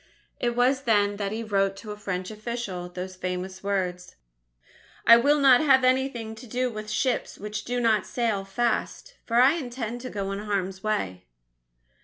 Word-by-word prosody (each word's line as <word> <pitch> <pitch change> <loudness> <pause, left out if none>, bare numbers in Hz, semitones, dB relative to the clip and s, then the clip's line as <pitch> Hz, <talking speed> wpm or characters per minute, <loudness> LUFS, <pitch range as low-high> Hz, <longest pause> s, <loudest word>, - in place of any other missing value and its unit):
It 240 -1 0
was 255 +2 +3
then 205 -3 +2
that 200 -1 -2
he 225 +2 -3
wrote 195 -2 +1
to 210 +2 -9
a - - -5
French 185 -2 -4
official, 215 -5 -5
those 185 +1 -6
famous 185 +1 -4
words: 180 -3 -2 0.9
"I 230 - +10
will 290 +5 +3
not 265 -3 +6
have 265 -4 +5
anything 255 -3 +1
to 245 +2 -11
do 250 +2 -1
with 215 -1 -7
ships 240 +4 -1
which 210 +1 -5
do 245 0 -1
not 225 -4 +2
sail 225 -5 -1
fast, 240 - -2
for 230 - -2
I 260 +4 +7
intend 245 -4 -5
to 255 - -6
go 195 -3 -3
in 195 - -3
harm's 195 -2 -2
way." 95 - -2
215 Hz, 175 wpm, -26 LUFS, 195-245 Hz, 0.9 s, I